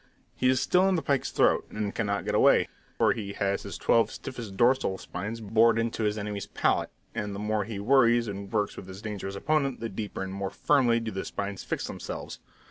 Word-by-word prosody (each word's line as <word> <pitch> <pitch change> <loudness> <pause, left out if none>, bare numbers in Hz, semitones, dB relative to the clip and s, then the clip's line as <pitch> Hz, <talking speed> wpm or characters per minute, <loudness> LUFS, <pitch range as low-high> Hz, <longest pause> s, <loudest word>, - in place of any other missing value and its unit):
He 130 - +2
is 130 -1 +3
still 180 +7 +3
in 190 - +2
the 165 - -1
pike's 140 -2 +1
throat, - - +2
and 105 -1 -3
cannot 100 -3 -1
get - - -1
away, - - +5 0.3
for - - +4
he 100 -3 -5
has 100 0 0
his - - -6
twelve 115 - +3
stiffest 115 -7 -7
dorsal 120 -5 +3
spines 110 +6 -6
bored 110 +2 +4
into 115 -1 -1
his 105 0 0
enemy's 105 -1 -4
palate; - - +1 0.2
and 105 -1 -3
the - - -5
more 105 -1 0
he 110 -1 -5
worries 120 +1 +4
and 100 -1 -6
works 105 -2 0
with - - -9
his 95 +2 -10
dangerous 100 -2 -5
opponent, 140 +3 0
the 115 0 -3
deeper 105 -1 -4
and 95 0 -5
more 100 0 -3
firmly 120 -3 +3
do 115 -1 -4
the 95 - -3
spines 100 -1 -4
fix - - -3
themselves. - - -6
110 Hz, 215 wpm, -28 LUFS, 100-120 Hz, 0.3 s, away